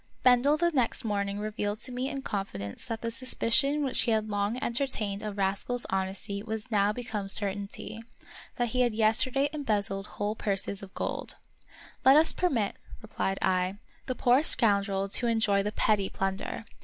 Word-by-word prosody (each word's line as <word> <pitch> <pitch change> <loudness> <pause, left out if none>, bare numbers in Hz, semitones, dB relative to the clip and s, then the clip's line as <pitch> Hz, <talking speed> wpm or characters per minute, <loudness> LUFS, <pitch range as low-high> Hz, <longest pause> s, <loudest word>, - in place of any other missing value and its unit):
Bendel 255 +4 +5
the 345 +2 +2
next 255 -4 0
morning 200 -2 -1
revealed 210 0 -3
to 255 - -1
me 250 +2 -2
in 275 -2 -5
confidence 100 - -4
that 225 -3 -4
the 230 - -1
suspicion 265 +4 +1
which 260 - 0
he - - 0
had 220 -1 +1
long 205 +3 0
entertained 230 -6 0
of 210 -1 -5
Rascal's 200 +5 0
honesty 195 +1 -2
was 220 +2 -5
now 205 -1 +3
become 210 -3 -4
certainty; 200 +2 -1 0.5
that 240 -1 0
he 250 +3 +1
had 240 -2 +2
yesterday 230 +5 +3
embezzled 205 -8 -1
whole 205 +1 -1
purses 200 -2 -2
of 195 -1 -10
gold. - - -4 0.3
" - - -21
Let 265 +2 +7
us 320 +1 +5
permit," 250 - 0 0.3
replied 195 -2 -2
I, 185 +1 +1
" - - -33
the 255 - -2
poor 245 +3 +4
scoundrel 200 -8 +2
to 240 +4 0
enjoy 220 -3 +2
the 205 +1 -2
petty 210 -3 +1
plunder. 195 +3 -3
215 Hz, 170 wpm, -29 LUFS, 200-245 Hz, 0.5 s, Let